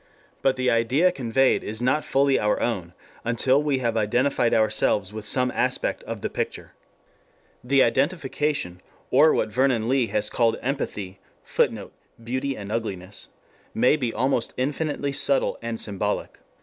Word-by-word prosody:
But 135 -1 +2
the 130 -1 +1
idea 125 +10 +3
conveyed 135 -3 +1
is 110 +1 -5
not 135 +5 +1
fully 135 0 +2
our 105 0 +1
own 90 -8 -2 0.3
until 130 +4 +2
we 145 -2 0
have 115 -1 0
identified 120 +3 +1
ourselves 105 -2 +2
with 110 -1 -5
some 125 +2 +2
aspect - - -1
of - - -6
the - - -1
picture. - - -4 0.9
The 135 +2 +4
identification, 140 - -1 0.3
or 150 +4 +6
what - - 0
Vernon 125 -1 +1
Lee 130 -1 +2
has 105 -1 0
called 115 -2 +2
empathy, 105 -8 -4 0.2
[Footnote: - - -1 0.3
Beauty 130 +3 -2
and 100 0 -7
Ugliness.] 100 -4 -4 0.5
may 125 +5 +4
be 125 -6 -2
almost 125 0 0
infinitely 145 +2 -2
subtle 140 0 +1
and 115 -1 -4
symbolic. 100 -3 -3
125 Hz, 145 wpm, -24 LUFS, 110-135 Hz, 0.9 s, or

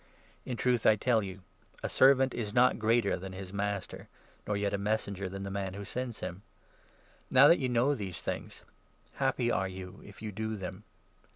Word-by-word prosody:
In 125 - -3
16 - - -4
truth 125 -2 +1
I 110 - +7
tell 115 +1 +2
you, 95 -1 -7 0.4
a - - 0
servant 135 -1 +5
is 105 -3 -4
not 125 +1 +4
greater 115 +2 +2
than 95 +1 -7
his 95 0 -8
master, 100 -1 -3 0.4
nor 105 - 0
yet 100 0 -1
a 100 - 0
messenger 100 -2 -1
than 100 +1 -6
the 100 - -5
man 95 -1 -3
who 100 0 -6
sends 125 0 -4
him. 90 +3 -5 0.9
Now 135 +3 +8
that 170 - +6
you 130 - 0
17 125 - -2
know 125 +5 +3
these 100 -9 -4
things, - - -5 0.5
happy 135 -3 +1
are 95 -3 +1
you 95 0 -9
if 105 - -13
you 110 - -4
do 110 +2 -3
them. 95 +1 -7
105 Hz, 200 wpm, -31 LUFS, 95-120 Hz, 0.9 s, Now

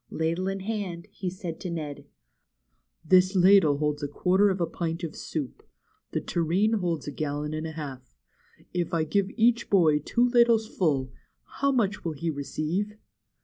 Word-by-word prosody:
Ladle 165 +3 -1
in 195 0 -3
hand, 195 -4 -4
he 190 -2 -4
said 175 -3 -6
to 185 - -5
Ned: 155 -4 -5 1.0
This 185 +3 +4
ladle 185 -5 +6
holds 150 0 -1
a 145 - -1
quarter 185 +7 +2
of 190 -1 -1
a 170 - +2
pint 165 +1 -4
of 160 -2 -4
soup. 145 -6 -5 0.5
The - - -1
tureen 190 +7 +1
holds 170 -5 -2
a - - -3
gallon 150 +1 -3
and 155 +1 -3
a 160 - -7
half. 135 -5 -8 0.6
If 175 -1 -1
I 160 - +2
give 190 +5 0
each 235 +1 +3
boy 160 -6 +4
two 240 +11 +1
ladles 235 -2 +4
full, 140 -10 0 0.5
how 280 0 +3
much 210 -6 0
will 165 - -2
he 160 +3 -2
receive?' 155 +8 -3
170 Hz, 170 wpm, -27 LUFS, 155-195 Hz, 1.0 s, ladle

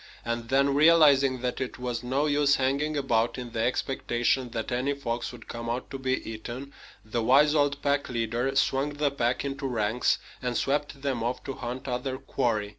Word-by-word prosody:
And 115 0 -3
then, 140 +1 +3
realizing 140 -4 +5
that 125 +1 -2
it 130 - -4
was 125 -2 -3
no 130 +4 0
use 145 -1 +3
hanging 140 +3 0
about 120 -4 +1
in 125 -2 -6
the 115 - -4
expectation 125 0 0
that 115 +1 -4
any 130 +4 0
fox 120 -4 -3
would 125 - -12
come 115 0 -5
out 120 +2 -3
to 135 - -5
be 130 0 -1
eaten, 120 +5 -7 0.3
the 115 +2 -2
wise 140 +6 +5
old 145 -2 +2
pack 140 0 +1
leader 120 +2 -1
swung 135 +2 +1
the 145 -1 +1
pack 125 -1 0
into 135 0 -3
ranks 115 -1 +1 0.2
and 125 -2 -1
swept 140 0 -1
them 130 -5 -1
off 120 +2 -2
to 135 - -4
hunt 125 +2 -6
other 130 +1 -2
quarry. 115 -6 -1
130 Hz, 190 wpm, -27 LUFS, 120-140 Hz, 0.3 s, realizing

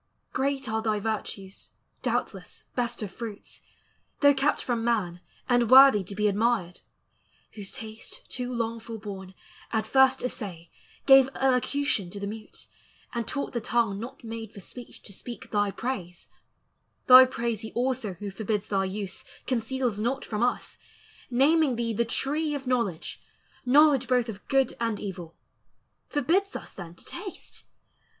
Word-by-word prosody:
"Great 270 +1 0
are 220 0 -1
thy 215 -1 0
virtues, 200 -2 -4 0.3
doubtless, - - -3
best 240 -2 -2
of 200 - -5
fruits, 220 -1 -8 0.6
Though 285 -1 +7
kept 275 +2 +1
from 235 -2 -1
man, 195 -7 0 0.3
and 245 -3 +3
worthy 265 -5 +9
to 200 - -7
be 210 +1 +2
admired, 205 -3 +1 0.7
Whose 205 -3 -7
taste, 220 0 -8
too 250 0 -4
long 230 -1 -2
forborne, 200 -4 -8 0.4
at 220 -2 0
first 265 +2 +4
assay 185 -9 -5 0.3
Gave 270 -1 +8
elocution 260 -5 +1
to 200 - -7
the 200 - -4
mute, 215 +1 -8 0.5
and 235 -2 -2
taught 280 -2 -3
The 235 - -1
tongue 220 -3 +1
not 240 +3 -8
made 225 -1 -6
for - - -11
speech 240 +5 -11
to 200 - -10
speak 240 +5 -9
thy 205 -1 +2
praise: 190 -6 -5 0.8
Thy 255 0 +10
praise 235 -4 -2
he 220 - -7
also 245 -5 -1
who 200 +3 -6
forbids 210 +1 -2
thy 195 -1 +1
use 195 0 -5 0.2
Conceals 245 -2 -1
not 245 +5 -1
from 215 -1 -3
us, 245 +1 -1 0.5
naming 280 +2 +4
thee 230 -1 -1
the 235 +2 +1
Tree 295 +6 -1
Of 275 -1 -5
Knowledge, 235 -10 -1 0.5
knowledge 280 -1 +5
both 250 -2 +2
of 205 -2 -8
good 270 -2 +2
and 230 -3 -1
evil; 175 -4 -7 0.7
Forbids 360 +8 +1
us - - -7
then 175 -3 -9
to - - -14
taste! 380 +1 -8
230 Hz, 150 wpm, -27 LUFS, 205-260 Hz, 0.8 s, Thy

